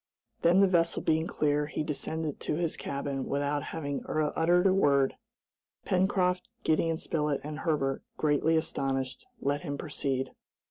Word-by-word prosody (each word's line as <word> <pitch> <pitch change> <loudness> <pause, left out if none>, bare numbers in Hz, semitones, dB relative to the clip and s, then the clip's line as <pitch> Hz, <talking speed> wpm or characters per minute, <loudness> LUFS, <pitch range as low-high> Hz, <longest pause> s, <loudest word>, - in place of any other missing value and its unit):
Then 175 +3 +5
the 195 - +6
vessel 170 -2 +2
being 160 +1 +2
clear, 150 -2 +1
he 155 - -2
descended 155 0 -3
to - - -2
his 165 0 -1
cabin 140 -1 -3
without 145 +1 0
having 145 -3 -4
uttered 160 +4 +2
a 190 - +5
word. 140 -7 +3 0.7
Pencroft, 180 -1 +1
Gideon 160 +1 +2
Spilett, 150 -3 -1
and 150 +1 -5
Herbert, 140 -5 0 0.2
greatly 155 +2 +2
astonished, 135 - -2
let 145 +1 0
him 145 -4 -4
proceed. 135 -3 -2
150 Hz, 140 wpm, -29 LUFS, 140-165 Hz, 0.7 s, the